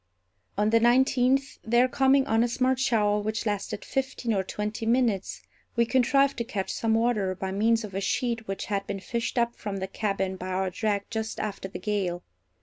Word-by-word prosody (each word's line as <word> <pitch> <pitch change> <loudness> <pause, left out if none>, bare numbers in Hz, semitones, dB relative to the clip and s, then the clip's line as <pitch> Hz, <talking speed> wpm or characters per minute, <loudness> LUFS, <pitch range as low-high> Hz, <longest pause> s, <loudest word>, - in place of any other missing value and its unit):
On 210 +1 +2
the 230 - +5
nineteenth, 260 +3 +3
there 240 +3 +4
coming 270 +1 +3
on 225 -3 +2
a - - +2
smart 255 +2 +1
shower 210 -5 +2
which 215 +2 -2
lasted 205 -1 -3
fifteen 260 -3 -2
or 195 - +1
twenty 210 +3 -4
minutes, 230 -5 +1 0.3
we 235 -1 +3
contrived 275 +3 +3
to - - +1
catch 210 -5 -3
some 225 -1 +1
water 220 -5 +1
by 190 +1 -4
means 225 +3 +2
of 205 -3 -7
a 195 - -2
sheet 230 +1 -1
which 195 0 -4
had 200 -1 -2
been 195 - -3
fished 235 +5 -3
up 235 0 +1
from 205 -2 -5
the 190 - -2
cabin 195 -2 -2
by 185 - -6
our 185 0 -1
drag 205 +1 -1
just 220 -1 -3
after 200 -2 -4
the 190 - -7
gale. 190 -5 -2
220 Hz, 195 wpm, -27 LUFS, 200-240 Hz, 0.3 s, the